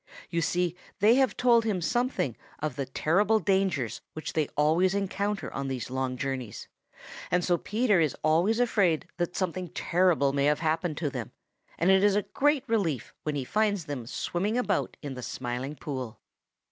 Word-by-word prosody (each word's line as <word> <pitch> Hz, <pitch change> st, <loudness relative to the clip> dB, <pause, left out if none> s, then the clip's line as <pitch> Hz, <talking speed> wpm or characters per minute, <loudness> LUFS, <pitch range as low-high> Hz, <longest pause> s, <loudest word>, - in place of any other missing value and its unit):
You 170 Hz, -1 st, 0 dB
see 175 Hz, +1 st, 0 dB, 0.2 s
they 210 Hz, +4 st, +5 dB
have 265 Hz, -2 st, +2 dB
told 235 Hz, -2 st, +5 dB
him 210 Hz, -4 st, 0 dB
something 240 Hz, -, 0 dB, 0.2 s
of 150 Hz, -4 st, -3 dB
the 135 Hz, -1 st, -3 dB
terrible 200 Hz, +11 st, +2 dB
dangers 190 Hz, -, 0 dB
which 155 Hz, -, -5 dB
they 155 Hz, -3 st, +1 dB
always 165 Hz, +6 st, +3 dB
encounter 200 Hz, -3 st, -2 dB
on 135 Hz, 0 st, -3 dB
these 130 Hz, -2 st, -4 dB
long 130 Hz, -1 st, -2 dB
journeys, 130 Hz, -5 st, -4 dB, 0.6 s
and 180 Hz, 0 st, +1 dB
so 175 Hz, -, +3 dB
Peter 215 Hz, -3 st, +2 dB
is 155 Hz, -4 st, +1 dB
always 170 Hz, +9 st, +3 dB
afraid 200 Hz, -9 st, +2 dB
that 175 Hz, 0 st, -2 dB
something 185 Hz, -1 st, -2 dB
terrible 170 Hz, -5 st, +2 dB
may 140 Hz, 0 st, +2 dB
have 150 Hz, +1 st, +2 dB
happened 160 Hz, -1 st, 0 dB
to 150 Hz, -4 st, -1 dB
them, 125 Hz, -5 st, -6 dB, 0.4 s
and 175 Hz, +4 st, +3 dB
it 190 Hz, 0 st, +5 dB
is 205 Hz, -1 st, +4 dB
a 205 Hz, -, +2 dB
great 290 Hz, +4 st, +1 dB
relief 185 Hz, -, -1 dB
when 150 Hz, -1 st, -2 dB
he 135 Hz, -3 st, -2 dB
finds 205 Hz, 0 st, +1 dB
them 135 Hz, -6 st, -5 dB
swimming 200 Hz, -, -1 dB
about 210 Hz, -6 st, 0 dB
in 145 Hz, -2 st, -4 dB
the 125 Hz, -, -7 dB
Smiling 125 Hz, +4 st, -4 dB
Pool. 130 Hz, -7 st, -6 dB
170 Hz, 175 wpm, -28 LUFS, 140-200 Hz, 0.6 s, they